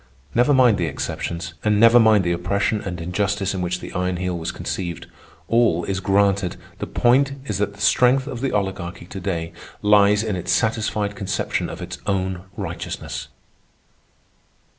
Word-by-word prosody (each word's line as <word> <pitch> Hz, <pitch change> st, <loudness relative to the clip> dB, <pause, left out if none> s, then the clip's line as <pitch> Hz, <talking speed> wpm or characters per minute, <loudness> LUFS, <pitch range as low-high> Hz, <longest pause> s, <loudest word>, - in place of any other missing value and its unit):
Never 125 Hz, +4 st, +3 dB
mind 125 Hz, -7 st, +5 dB
the 85 Hz, -, 0 dB
exceptions, 85 Hz, +3 st, -4 dB
and 105 Hz, -1 st, +2 dB
never 115 Hz, +2 st, +7 dB
mind 110 Hz, -3 st, +5 dB
the 85 Hz, -, 0 dB
oppression 100 Hz, +5 st, 0 dB
and 90 Hz, -3 st, -5 dB
injustice 95 Hz, +3 st, -1 dB
in 95 Hz, -, -3 dB
which 90 Hz, 0 st, -2 dB
the -, -, -8 dB
Iron 90 Hz, 0 st, -1 dB
Heel 90 Hz, 0 st, -2 dB
was 80 Hz, -1 st, -3 dB
conceived. 85 Hz, -3 st, -4 dB, 0.4 s
All 115 Hz, -8 st, +3 dB
is 95 Hz, +1 st, -2 dB
granted. 100 Hz, -1 st, +2 dB, 0.2 s
The -, -, -4 dB
point 135 Hz, +3 st, +3 dB
is 105 Hz, -7 st, -2 dB
that 100 Hz, 0 st, -1 dB
the 100 Hz, -, -12 dB
strength 125 Hz, +5 st, +4 dB
of 125 Hz, -4 st, -6 dB
the 135 Hz, -, 0 dB
Oligarchy 95 Hz, -4 st, -3 dB
today 90 Hz, -3 st, -4 dB, 0.3 s
lies 105 Hz, 0 st, +5 dB
in 110 Hz, -3 st, -2 dB
its 90 Hz, -, -3 dB
satisfied 110 Hz, -2 st, 0 dB
conception 95 Hz, -1 st, -2 dB
of -, -, -7 dB
its -, -, -7 dB
own 95 Hz, -1 st, -1 dB
righteousness. -, -, -5 dB
100 Hz, 160 wpm, -22 LUFS, 90-110 Hz, 0.4 s, never